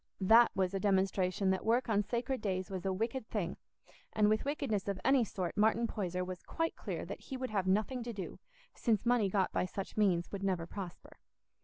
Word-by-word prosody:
That 225 +5 +7
was 190 -1 +1
a 195 - 0
demonstration 190 -1 +2
that 190 - -1
work 235 +3 +2
on 210 -2 +3
sacred 240 +4 -2
days 190 -1 -2
was 190 -1 -3
a - - +1
wicked 225 +5 -2
thing; 190 -5 -2 0.6
and 210 -1 +4
with 215 +3 +1
wickedness 275 -9 -1
of 200 -2 -2
any 265 -1 +5
sort 185 -5 -3
Martin 220 +2 +3
Poyser 180 -5 -2
was 180 -1 -6
quite 330 0 -2
clear - - -5
that - - -7
he 265 - -6
would 255 -3 -4
have 195 -3 0
nothing 215 +6 +1
to 240 - -3
do, 195 -5 -6 0.3
since 225 -2 0
money 235 -4 +3
got 190 -1 +1
by - - +1
such 195 +3 -6
means 180 -5 +2
would 200 - -4
never 185 -4 0
prosper. 180 0 -8
200 Hz, 205 wpm, -33 LUFS, 185-230 Hz, 0.6 s, That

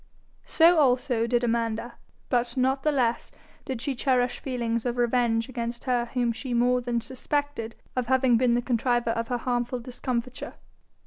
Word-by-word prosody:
So 335 0 +5
also 250 -4 +2
did 240 0 +1
Amanda; 230 0 -1 0.4
but 240 0 0
not 265 +2 +2
the 305 - +2
less 245 -5 0 0.3
did 255 -3 -4
she 280 - -1
cherish 250 -1 +1
feelings 235 -3 -2
of 245 -1 -2
revenge 235 -2 +1
against 235 -2 -5
her 245 -2 +1
whom 240 -2 +2
she 240 +2 -4
more 250 +1 +3
than 240 -1 -1
suspected 265 -2 -3 0.2
of 250 -2 -1
having 260 -1 +4
been 240 0 +3
the 240 0 +1
contriver 240 -1 +1
of 230 0 -2
her 245 - -1
harmful 245 0 -1
discomfiture. 250 0 -4
245 Hz, 165 wpm, -26 LUFS, 235-255 Hz, 0.4 s, So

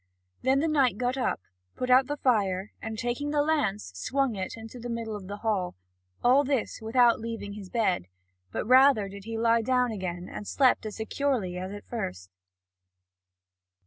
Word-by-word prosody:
Then 265 +2 +3
the 325 - +1
knight 275 -8 +2
got 250 +2 0
up, 255 - -1 0.3
put 250 0 -1
out 255 +1 +6
the 290 - -3
fire 205 -7 +1
and, 220 -1 -5
taking 245 +6 -2
the 290 -1 +2
lance, 245 - 0
swung 265 - 0
it 190 -1 -4
in 225 - -9
the 240 +1 -8
middle 230 -2 -3
of 195 -3 -8
the 200 +1 -5
hall, 195 -5 0 0.5
all 260 +4 +5
this 270 -6 -1
without 235 +1 +4
leaving 225 -3 -5
his 200 -3 -9
bed; 190 - 0 0.4
rather 255 - +5
did 200 0 -10
he 225 0 -4
lie 230 0 +3
down 250 +1 +2
again 180 -4 -4
and 205 - -7
slept 255 -5 +3
as 210 - -6
securely 220 -5 -1
as 185 +1 -5
at 205 0 -8
first. 90 - -5
230 Hz, 175 wpm, -28 LUFS, 200-255 Hz, 0.5 s, out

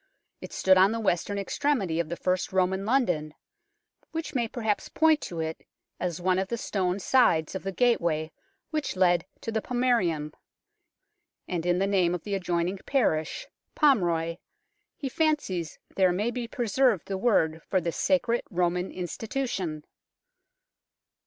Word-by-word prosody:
It - - -8
stood 190 0 +4
on 190 +2 +6
the 230 - -2
western 200 -1 0
extremity 200 - 0
of 165 -2 -1
the 170 - -2
first 185 +1 -1
Roman 190 +1 +1
London, 175 - +1 0.7
which 325 -1 -5
may 240 -4 0
perhaps 220 -3 -2
point 315 -1 +3
to 170 - -5
it 160 0 -4 0.4
as 175 -2 -2
one 185 +1 +2
of 190 - -1
the 235 - -2
stone 185 -4 -1
sides 190 -8 +3
of 190 - -4
the 195 - -3
gateway 170 -9 +1 0.4
which 305 -8 -2
led 175 -2 +3
to 225 - -4
the 220 0 -1
Pomaerium 200 -13 0 0.6
"; - - -54
and 175 -1 -2
in 175 0 +3
the 195 - +2
name 185 -3 +2
of 180 - -7
the 205 - -4
adjoining 180 0 -1
parish 160 - 0 0.3
Pomroy 175 - +2 0.6
he 280 - -4
fancies 260 - -1 0.2
there 185 -2 +4
may 210 +6 0
be 240 -1 -4
pre 240 0 -3
served 235 -4 +2
the 195 - -2
word 165 -7 +2
for 190 - +3
this 170 -1 -3
sacred 245 -4 +2
Roman 180 0 0
institution. 185 - -3
190 Hz, 155 wpm, -27 LUFS, 175-235 Hz, 0.7 s, on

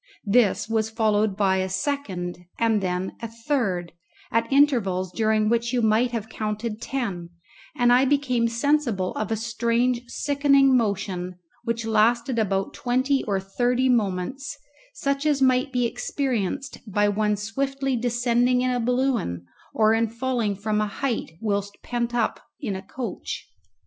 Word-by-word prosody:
This 215 0 +3
was 220 -1 0
followed 215 -3 +1
by 195 -2 +3
a 190 0 -1
second 190 -5 -3 0.2
and 225 -2 +2
then 180 0 -2
a 230 - -3
third, 225 - -2 0.4
at 230 +1 0
intervals 220 -11 +3
during 215 0 +1
which 235 +2 +1
you 245 -2 +1
might 220 +3 +3
have 230 -3 -4
counted 215 0 -4
ten, 195 -11 -3 0.5
and 245 0 +4
I 255 +2 +5
became 260 -4 +2
sensible 235 -5 0
of 215 0 -3
a - - +2
strange 235 +2 0
sickening 275 0 +3
motion, 195 -5 -1 0.3
which 230 -1 -2
lasted 230 +3 +2
about 195 -2 0
twenty 260 +3 +1
or 200 -3 0
thirty 245 +6 0
moments, 235 +5 -1 0.4
such 275 0 -1
as 290 -2 +2
might 260 0 +3
be 250 -1 +1
experienced 255 0 -2
by 205 +1 +3
one 210 +1 +1
swiftly 270 +6 -2
descending 245 +1 +2
in 255 0 +1
a 250 - 0
balloon, 240 - 0 0.3
or 220 0 +3
in 225 +1 +2
falling 230 -3 -1
from 210 +2 -1
a 210 - 0
height 230 -4 -3
whilst 200 -2 -2
pent 240 0 -2
up 230 -2 0 0.2
in 215 -9 -3
a 190 - -5
coach. 235 +5 -6
230 Hz, 150 wpm, -24 LUFS, 205-250 Hz, 0.5 s, I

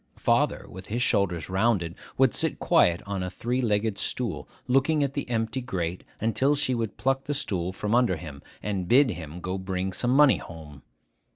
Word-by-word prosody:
Father, - - +1
with 95 0 -10
his 120 +4 -1
shoulders 90 - +1
rounded, 95 -3 +1 0.2
would 130 -3 +4
sit - - 0
quiet 85 0 +3
on 100 -2 -3
a 90 - -2
three 120 +7 -2
legged 105 -2 0
stool, - - -2 0.2
looking 140 +4 +3
at 140 -1 -1
the 140 -3 -4
empty 115 +2 -1
grate, 90 -7 -3 0.2
until 130 +6 +2
she 145 -3 0
would 115 -4 -3
pluck 135 0 0
the 145 - -2
stool 95 - -2
from 105 +3 -3
under 120 -6 +3
him, 75 -4 -9 0.2
and 100 -4 -2
bid 130 +3 +5
him 80 -1 -7
go 90 +2 -3
bring 95 0 -3
some 120 - -1
money 145 -2 +6
home. 75 -4 -11
105 Hz, 185 wpm, -26 LUFS, 90-125 Hz, 0.2 s, money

